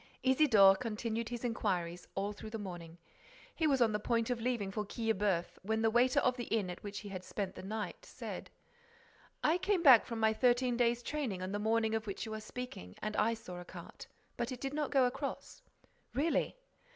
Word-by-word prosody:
Isidore 250 -8 +6
continued 230 0 -3
his 240 0 -5
inquiries 180 -7 -2
all 200 +2 -1
through 215 +1 -9
the 225 - -4
morning. 175 -5 -7 0.6
He 320 - +1
was 270 -4 +4
on 225 - +2
the 210 - 0
point 230 +2 0
of 240 -2 -2
leaving 230 -5 -1
for 210 +2 -2
Quillebeuf, 205 -5 -1
when 220 +3 -1
the 225 - +4
waiter 245 +2 +4
of 255 0 +2
the 240 - -3
inn 205 -6 0
at 180 - -9
which 205 -1 -6
he 205 - -8
had 185 -2 -6
spent 195 0 -4
the - - -9
night 210 +3 -5
said: - - -7 0.9
"I 325 +4 +3
came 370 -1 +1
back 260 -7 +8
from 230 -1 -4
my 220 0 +4
thirteen 245 +1 +3
days' 240 0 +2
training 240 -12 -2
on 185 - -3
the 205 - -2
morning 220 +1 +1
of 220 -1 -1
which 200 +3 -4
you 220 - -5
are 215 - -4
speaking 215 - -7
and 215 0 -3
I 230 +2 +2
saw 180 -5 -8
a - - -7
cart, - - -10 0.3
but 240 +2 -2
it 250 - -5
did 270 +1 -3
not 300 -1 -1
go 270 -3 +4
across." 270 - -4 0.5
"Really?" 315 - +1
225 Hz, 210 wpm, -34 LUFS, 205-250 Hz, 0.9 s, back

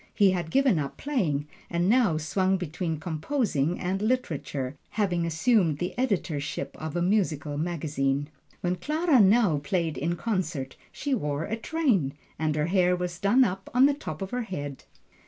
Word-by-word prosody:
He 200 -3 +5
had 175 -3 -2
given 265 - +3
up 140 -2 -4
playing, 165 - -1 0.2
and 170 +1 0
now 220 -7 +4
swung 185 +5 +1
between 165 -2 -3
composing 170 - -1
and 190 +2 -1
literature, 150 - -1 0.2
having 175 -5 +1
assumed 165 - +2
the 180 +3 -3
editorship 180 - -2
of 155 0 -4
a 175 - +1
musical 165 -7 0
magazine. 145 -3 -1 0.3
When 180 0 0
Clara 305 - +2
now 200 -6 +5
played 165 0 -1
in 170 +4 0
concert, 170 - -2 0.2
she 285 - -2
wore 150 - -1
a 220 - -2
train, 230 - +1 0.3
and 155 -1 0
her 150 0 +1
hair 180 0 +3
was 180 -1 -4
done 235 +7 +5
up 195 -4 -2
on 255 +2 +7
the 285 - +4
top 195 - -6
of 190 - -6
her 250 - -1
head. 145 - -6
180 Hz, 165 wpm, -27 LUFS, 155-215 Hz, 0.3 s, on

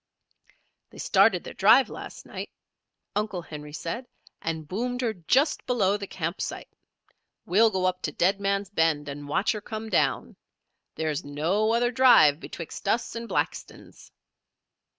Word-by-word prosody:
"They - - -16
started - - +3
their - - -8
drive - - +6
last - - -9
night," - - -7 0.7
Uncle 205 -4 -2
Henry 150 -2 -9
said, 230 +11 -5 0.3
"and 160 -2 -4
boomed 245 - -2
her 230 -3 0
just 260 - +1
below 205 -6 +2
the 200 -1 -5
campsite. 170 0 -4 0.8
We'll 220 +5 +4
go 190 -3 -1
up 185 0 0
to - - -2
Dead 190 +3 +1
Man's 200 0 -1
Bend 160 -5 +1
and 145 0 -7
watch 195 +9 +1
her 210 -2 -4
come 220 +1 -6
down. - - 0 0.6
There 160 -1 -1
is 150 +3 -3
no 170 +10 0
other 240 +1 +2
drive 245 - +6
betwixt 170 +4 -8
us 230 +4 0
and 230 0 -5
Blackton's." - - -4
195 Hz, 150 wpm, -26 LUFS, 160-225 Hz, 0.8 s, drive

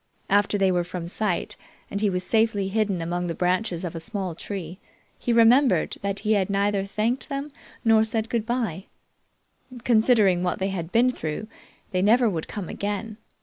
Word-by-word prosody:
After 205 +1 +3
they 195 -1 +3
were 175 -1 +1
from 175 -1 -6
sight 195 0 -2 0.4
and 200 - -3
he 210 - +3
was 180 -1 -1
safely 220 -2 +1
hidden 200 -4 0
among 175 +1 -2
the 165 - -3
branches 180 0 0
of 175 - -4
a 165 - -5
small 195 -1 -4
tree, 180 0 -6 0.4
he 240 - -1
remembered 235 +4 +4
that 200 0 -2
he 215 0 +2
neither 200 0 +1
had 195 - -7
thanked 225 +8 -1
them 280 +1 -4 0.3
nor 220 -1 +5
said 220 0 -1
good 230 -1 -1
bye. 225 -7 -2 1.0
Considering 220 -6 +4
what 180 0 -1
they 190 +1 -1
had 175 -3 -4
been 245 +4 +4
through, 155 0 -5 0.4
they 185 -2 +1
never 235 +5 +4
would 170 -7 -2
come 200 -5 -5
again. 210 +2 -4
200 Hz, 180 wpm, -25 LUFS, 180-225 Hz, 1.0 s, nor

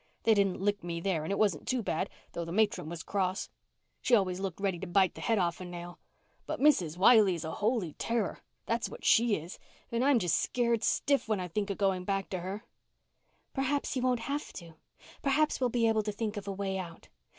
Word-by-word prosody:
They 225 - +5
didn't 200 -3 +2
lick 205 0 0
me 170 -1 -3
there 170 -2 0
and 160 - -3
it 200 - 0
wasn't 200 -8 +1
too 255 -3 0
bad, 185 +1 -1 0.2
though 170 - -4
the 165 - -6
matron 205 -5 +1
was 170 -1 -6
cross. 190 -1 -1 0.5
She 245 - +4
always 185 -4 +1
looked 195 -2 -4
ready 195 -3 -1
to 190 - -5
bite 185 +1 +3
my - - -8
head 225 -2 +1
off 175 -2 0
a - - -5
nail. 175 0 -8 0.5
But - - -3
Mrs. 185 - +3
Wiley 205 -1 +6
is 165 -1 -5
a 160 - -3
holy 210 - -1
terror, 230 -4 -2 0.3
that's 230 0 -1
what - - -10
she 230 -2 +5
is, 165 +2 -7 0.3
and 235 +1 +1
I'm 280 -1 +5
just 175 -7 +2
scared 235 -2 0
stiff 280 -4 +1
when 215 -3 0
I 180 - -3
think 200 +4 -2
of 200 - -2
going 190 -2 +1
back 195 +1 -2
to 185 - -2
her." 190 +5 -5 0.9
"Perhaps 275 +1 -1
you 255 - 0
won't 250 -2 +1
have 285 +5 -3
to. 170 -2 -10 0.5
Perhaps 290 +1 +2
we'll 250 - +3
be 230 -1 +2
able 220 -1 +3
to 210 0 -3
think 215 +1 -3
of 205 -1 -6
a - - -1
way 195 -1 -2
out. 170 -3 -9
200 Hz, 225 wpm, -31 LUFS, 180-230 Hz, 0.9 s, Wiley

